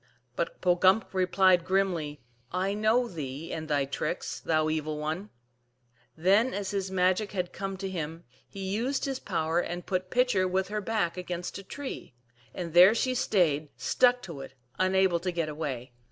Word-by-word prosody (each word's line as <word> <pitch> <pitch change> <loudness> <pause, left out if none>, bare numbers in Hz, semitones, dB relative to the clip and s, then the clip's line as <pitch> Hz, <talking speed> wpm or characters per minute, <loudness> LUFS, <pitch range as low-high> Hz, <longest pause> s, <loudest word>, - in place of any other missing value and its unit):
But 170 - -3
Pogumk 185 +4 +3
replied 185 -1 +4
grimly, 175 -6 0 0.2
" 120 0 -38 0.2
I 200 - 0
know 220 +4 +2
thee 150 - -6
and 160 -1 -4
thy 145 -2 +1
tricks, 140 +5 -3
thou 155 -1 +1
the 155 - +1
evil 155 -1 -2
one." 160 +7 -3 0.9
Then, 200 +9 +3
as 200 -1 -3
his 195 -2 -2
magic 185 +3 +1
had 180 -2 -2
come 195 -1 -4
to 195 +1 -4
him, 165 -2 -5 0.3
he 195 - -7
used 235 +10 -1
his 270 -2 -2
power, 165 -3 0
and 175 0 -3
put 185 -1 -2
Pitcher 245 -6 +2
with 190 +1 0
her 210 0 -2
back 195 -5 -1
against 180 +1 -4
a - - -9
tree; 265 - -7 0.4
and 170 -3 -6
there 180 +5 +8
she 255 +2 +1
stayed, 160 - +1
stuck 250 0 +3
to 165 -7 -7
it, 135 - -10 0.2
unable 185 -1 +3
to 180 +2 -2
get 165 -3 -2
away. 140 -5 -4
185 Hz, 175 wpm, -29 LUFS, 160-195 Hz, 0.9 s, there